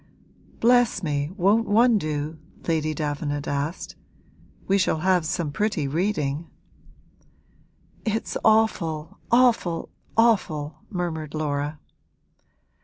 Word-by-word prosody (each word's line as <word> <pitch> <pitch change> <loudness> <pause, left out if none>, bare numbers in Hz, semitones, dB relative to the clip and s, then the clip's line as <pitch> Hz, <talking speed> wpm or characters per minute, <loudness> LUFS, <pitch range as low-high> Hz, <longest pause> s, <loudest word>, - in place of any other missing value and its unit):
'Bless 240 -4 +3
me, 145 -2 -1
won't 210 +5 +3
one 225 +1 +4
do?' 155 -1 -3 0.3
Lady 155 -2 +1
Davenant 145 -1 -3
asked. 145 +5 -3 0.7
'We 195 +1 +3
shall 185 - +2
have 180 -3 +2
some 160 -3 -2
pretty 190 -4 -1
reading.' 155 -2 -1 1.5
'It's 220 0 -2
awful, 170 -8 +1
awful, 230 -9 +3 0.3
awful!' 155 -10 +2
murmured 165 -6 -3
Laura. 150 0 -2
165 Hz, 95 wpm, -24 LUFS, 150-210 Hz, 1.5 s, one